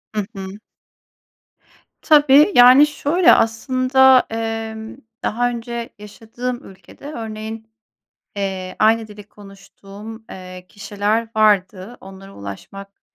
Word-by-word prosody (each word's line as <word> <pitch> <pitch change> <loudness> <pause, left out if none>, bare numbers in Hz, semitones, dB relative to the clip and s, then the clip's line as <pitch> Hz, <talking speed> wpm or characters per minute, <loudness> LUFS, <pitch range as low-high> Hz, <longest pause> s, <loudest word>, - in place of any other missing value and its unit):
I - - 0 0.2
hı. 190 +1 -8 1.4
Tabii, 295 +3 +5
yani, 255 +4 +7
şöyle 305 +4 +2
aslında, 255 +3 +3
emm, 225 0 -5 0.3
daha 245 +3 0
önce 235 0 -6
yaşadığım 230 +4 -7
ülkede, 190 +7 -16
örneğin, 220 -2 -8 0.7
eee, 190 -2 -5
aynı 220 +1 +2
dili 210 0 -12
konuştuğum, 205 +2 -14
eee, 185 -1 -11
kişiler 210 +2 -2
vardı. 205 0 +1
Onlara 195 +1 -13
ulaşmak 195 - -11
220 Hz, 95 wpm, -19 LUFS, 195-245 Hz, 1.4 s, yani